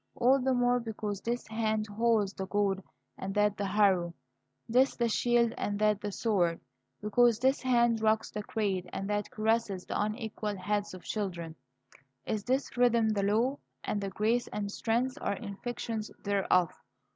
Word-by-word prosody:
All 255 +3 +4
the 260 0 +2
more 245 0 +3
because 215 -3 -4
this 240 +3 -2
hand 220 -1 0
holds 215 -1 +1
the 190 -1 -5
goad 200 -1 +1 0.4
and 195 +1 -4
that 210 0 +3
the 200 0 -2
harrow, 185 -4 +2 0.5
this 255 +4 +3
the 235 - +1
shield 235 0 +2
and 205 0 -1
that 210 -1 +2
the 205 - -3
sword, 185 -6 +1 0.4
because 230 +2 +4
this 265 +3 +2
hand 240 -3 +3
rocks 220 0 +2
the 210 - -4
cradle 195 -4 -2
and 195 - -3
that 205 -1 -1
caresses 215 -3 0
the - - -2
unequal 215 -1 -3
heads 205 +1 -2
of 185 - -11
children, 175 -6 -3 0.7
is 215 -2 -2
this 260 +2 0
rhythm 235 -2 +4
the 210 -2 +1
law; 225 +7 +2 0.3
and 205 - -2
grace 230 +3 +1
and 205 -1 -4
strength 240 +4 -1
are 200 - 0
inflections 225 +1 -5
thereof. 195 -4 +2
215 Hz, 160 wpm, -30 LUFS, 200-235 Hz, 0.7 s, All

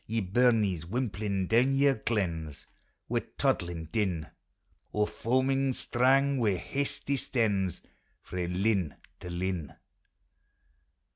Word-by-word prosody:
Ye 115 +1 0
burnies, 105 -4 +2
wimplin' 100 -4 -1
down 125 +4 +4
your 140 0 +5
glens, 85 - -2 0.4
Wi' - - +1 0.2
toddliu' 85 -2 0
din, 95 -8 0 0.7
Or 105 0 +2
foaming 130 +4 +1
strung, 135 +3 +2
wi' 105 -5 +2
hasty 140 +7 -2
stens, 105 -8 0 0.4
Frae 90 -1 -3
lin 95 -3 0 0.2
to 90 - -8
liu 90 -4 -2
105 Hz, 100 wpm, -30 LUFS, 90-125 Hz, 0.7 s, your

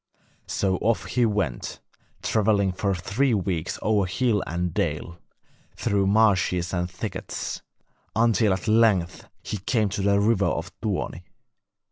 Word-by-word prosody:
So 95 -2 0
off 115 +3 0
he 120 -2 +2
went, 95 - -2 0.4
travelling 105 -3 +2
for 95 +1 -1
three 110 +9 +1
weeks 90 -4 -2
over 105 -3 +2
hill 105 +3 +1
and 85 0 -2
dale, 85 0 -2 0.6
through 100 -1 +1
marshes 95 -4 +2
and 90 -1 -1
thickets, 95 +4 -5 0.5
until 115 -2 +3
at 95 +3 -4
length 110 -6 +2 0.2
he 105 - -4
came 105 +2 +1
to 100 - -3
the 100 0 +3
river 100 -1 +3
of 85 +4 -2
Tuoni. 100 -4 -2
100 Hz, 130 wpm, -25 LUFS, 90-110 Hz, 0.6 s, until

